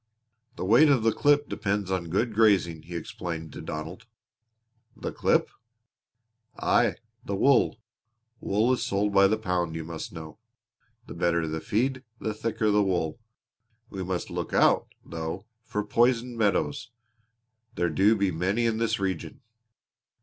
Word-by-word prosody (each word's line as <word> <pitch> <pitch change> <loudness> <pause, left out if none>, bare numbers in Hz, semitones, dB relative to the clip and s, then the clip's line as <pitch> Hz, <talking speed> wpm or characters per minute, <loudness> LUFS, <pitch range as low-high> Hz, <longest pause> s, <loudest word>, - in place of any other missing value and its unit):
"The - - -4
weight 120 +10 +6
of 135 -6 +3
the 115 - +4
clip 145 0 +3
depends 100 -1 -2
on 90 -3 -2
good 110 +6 0
grazing," 100 -7 +3
he 85 +2 -9
explained 80 -1 -6
to - - -7
Donald. 80 +8 -7 0.9
"The - - -4
clip?" - - +1 1.1
"Aye, 115 -7 +2 0.3
the 100 - -3
wool. 130 +4 +3 0.6
Wool 110 +6 +1
is 125 - -1
sold 100 +1 0
by 100 0 +6
the 110 +2 +1
pound, 90 -5 -2
you 80 - -4
must 80 0 -7
know. 80 +4 -10 0.7
The - - -9
better 85 -1 0
the 80 0 -3
feed, 125 +4 -1 0.2
the 110 - -2
thicker 110 0 -1
the 105 0 +4
wool. 90 -4 -1 0.7
We 95 -1 -4
must 90 -1 -3
look - - -4
out, - - +4 0.2
though, 80 +4 -5 0.2
for 105 - -2
poisoned 120 +2 +2
meadows. 105 -5 0 0.9
There 85 -1 0
do 100 +8 +4
be 100 -2 +1
many 95 +8 0
in 115 -1 0
this 115 -3 0
region." 95 -3 -3
100 Hz, 150 wpm, -27 LUFS, 85-115 Hz, 1.1 s, weight